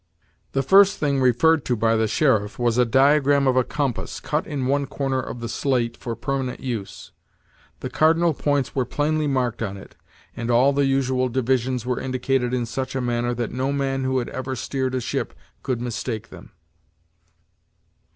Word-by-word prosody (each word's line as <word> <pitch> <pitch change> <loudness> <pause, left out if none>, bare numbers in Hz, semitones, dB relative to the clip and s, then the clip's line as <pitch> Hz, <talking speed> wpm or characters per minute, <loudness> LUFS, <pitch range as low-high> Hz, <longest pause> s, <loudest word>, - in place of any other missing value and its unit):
The 135 - +1
first 195 +6 +6
thing 140 -2 0
referred 140 +5 +3
to 125 - +1
by 115 +1 +2
the 110 0 +2
sheriff 110 -4 +1
was 120 -1 +1
the 125 -1 +4
diagram 140 +2 +4
of 130 -1 +3
a 130 - +4
compass, 140 -2 -3
cut 150 +1 -2
in 140 -4 -3
one 140 +1 +1
corner 135 -1 -2
of 120 -1 -7
the 115 - -3
slate 120 -1 -1
for 115 -2 -5
permanent 130 +2 -3
use. 115 -7 -6 0.7
The 130 - -4
cardinal 165 +3 +3
points 145 -2 -1
were 130 - +1
plainly 150 +4 0
marked 130 -4 -1
on 100 0 -3
it, 95 - -13 0.4
and 115 0 -4
all 125 +4 +4
the 140 0 +2
usual 130 -1 +1
divisions 130 0 0
were 125 0 -1
indicated 130 -1 -1
in 125 -1 -1
such 130 +3 -4
a - - 0
manner 120 -1 -1
that 120 -1 -3
no 130 +3 -1
man 135 -1 -1
who 130 0 0
had 120 - -2
ever 130 0 -4
steered 130 +1 -2
a 130 - -1
ship - - -3 0.3
could 125 -3 -2
mistake 120 -2 -4
them. - - -12
130 Hz, 180 wpm, -23 LUFS, 120-140 Hz, 0.7 s, first